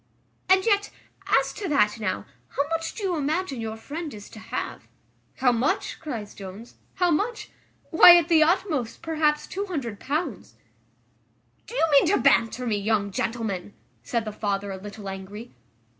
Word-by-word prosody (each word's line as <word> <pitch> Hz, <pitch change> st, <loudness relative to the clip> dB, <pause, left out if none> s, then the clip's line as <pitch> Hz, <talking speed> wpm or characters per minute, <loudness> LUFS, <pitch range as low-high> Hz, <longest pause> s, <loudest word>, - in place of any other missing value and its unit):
"And 380 Hz, 0 st, +5 dB
yet, 410 Hz, -2 st, +2 dB, 0.4 s
as 275 Hz, 0 st, +2 dB
to 400 Hz, +4 st, -5 dB
that 225 Hz, -7 st, +2 dB
now, 185 Hz, -, -2 dB, 0.3 s
how 280 Hz, +1 st, +1 dB
much 330 Hz, 0 st, -2 dB
do 430 Hz, -, -6 dB
you 370 Hz, -3 st, 0 dB
imagine 300 Hz, -2 st, -1 dB
your 220 Hz, 0 st, -4 dB
friend 300 Hz, +7 st, -6 dB
is 205 Hz, -1 st, -11 dB
to 220 Hz, -, -11 dB
have?" 220 Hz, -, -5 dB, 0.5 s
"How 255 Hz, -1 st, +3 dB
much?" 240 Hz, +3 st, -1 dB
cries 230 Hz, -9 st, -6 dB
Jones, 200 Hz, +4 st, -10 dB, 0.2 s
"how 360 Hz, -2 st, +2 dB
much? 440 Hz, +9 st, -1 dB, 0.4 s
Why, 345 Hz, +1 st, +10 dB
at 340 Hz, -, +2 dB
the 330 Hz, -2 st, +5 dB
utmost, 310 Hz, -, +1 dB
perhaps 310 Hz, -2 st, +1 dB
£200." 305 Hz, -, -4 dB, 1.7 s
"Do 480 Hz, -, -9 dB
you 415 Hz, -, +3 dB
mean 285 Hz, +2 st, +6 dB
to 395 Hz, -, +3 dB
banter 235 Hz, 0 st, +3 dB
me, 220 Hz, -3 st, 0 dB
young 205 Hz, -1 st, 0 dB
gentleman?" 210 Hz, -3 st, -3 dB, 0.3 s
said 235 Hz, -2 st, -2 dB
the 215 Hz, -, -4 dB
father, 200 Hz, -1 st, -2 dB
a 190 Hz, -, -5 dB
little 205 Hz, +1 st, -9 dB
angry. 195 Hz, +4 st, -7 dB
255 Hz, 160 wpm, -25 LUFS, 210-330 Hz, 1.7 s, Why